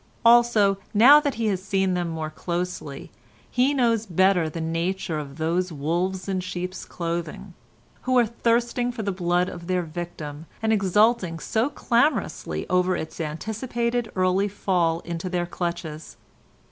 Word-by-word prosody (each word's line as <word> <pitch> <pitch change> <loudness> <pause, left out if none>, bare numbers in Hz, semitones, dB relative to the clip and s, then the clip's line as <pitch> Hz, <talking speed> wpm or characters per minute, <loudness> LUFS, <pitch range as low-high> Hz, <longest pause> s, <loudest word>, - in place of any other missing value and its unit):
Also, 230 -4 +5 0.2
now 265 +8 +9
that 290 -2 -2
he 230 - -2
has 195 -4 0
seen 190 -1 0
them 175 -1 -1
more 160 -1 -4
closely, 170 -4 -4 0.4
he 255 +3 +3
knows 230 -5 +1
better 185 -2 +3
the 165 - -6
nature 165 +1 -2
of 140 -1 -8
those 170 +3 0
wolves 175 +5 -2
in 190 -1 -1
sheep's 185 0 -5
clothing, 170 -2 -5 0.5
who 255 0 +1
are 240 - +5
thirsting 235 +2 0
for 235 -2 -5
the 200 - -1
blood 180 -1 +1
of 170 -2 -8
their 180 -1 0
victim, 160 -2 -7
and 220 0 +1
exulting 205 -2 +2
so 220 +9 0
clamorously 275 +1 0
over 180 0 +2
its 160 +1 -6
anticipated 235 +8 -2
early 185 +2 +2
fall 175 -4 0
into 170 +1 -5
their 175 -1 -1
clutches. 170 -3 -5
185 Hz, 145 wpm, -24 LUFS, 170-220 Hz, 0.5 s, now